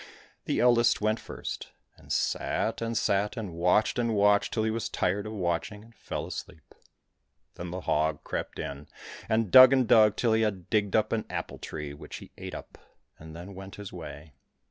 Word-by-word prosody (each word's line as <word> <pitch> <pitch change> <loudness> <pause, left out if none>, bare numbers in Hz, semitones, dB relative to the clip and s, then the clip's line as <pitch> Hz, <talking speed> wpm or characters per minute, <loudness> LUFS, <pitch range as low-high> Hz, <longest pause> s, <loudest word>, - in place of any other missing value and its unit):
The - - 0
eldest 120 -1 +4
went 110 +1 +1
first, - - -7 0.2
and - - -13
sat - - -1
and 115 0 -1
sat 100 +4 +1
and 105 -6 -5
watched 90 +8 +2
and 115 -2 +1
watched 100 0 +3
till 110 - 0
he 110 - +1
was 115 +1 -3
tired 100 +4 -1
of 110 - -6
watching, 90 +2 -2
and 115 +1 -18
fell - - -5
asleep. 80 - -9 0.8
Then 85 - -7
the 90 +2 -5
hog 80 -2 0
crept - - -4
in, 70 +1 -6 0.4
and 110 -3 +1
dug 130 0 +10
and 130 -3 +3
dug 110 -2 +6
till 115 -1 +2
he 110 - +3
had 100 -5 -2
digged 105 -3 +1
up 110 -1 +2
an 110 -1 -1
apple - - -5
tree, 75 -2 -6
which 70 - -10
he - - -10
ate - - -7
up, - - -10 0.4
and 80 0 -11
then 90 +4 -9
went 95 +1 -9
his 105 -2 -9
way. 75 0 -9
105 Hz, 190 wpm, -28 LUFS, 85-110 Hz, 0.8 s, dug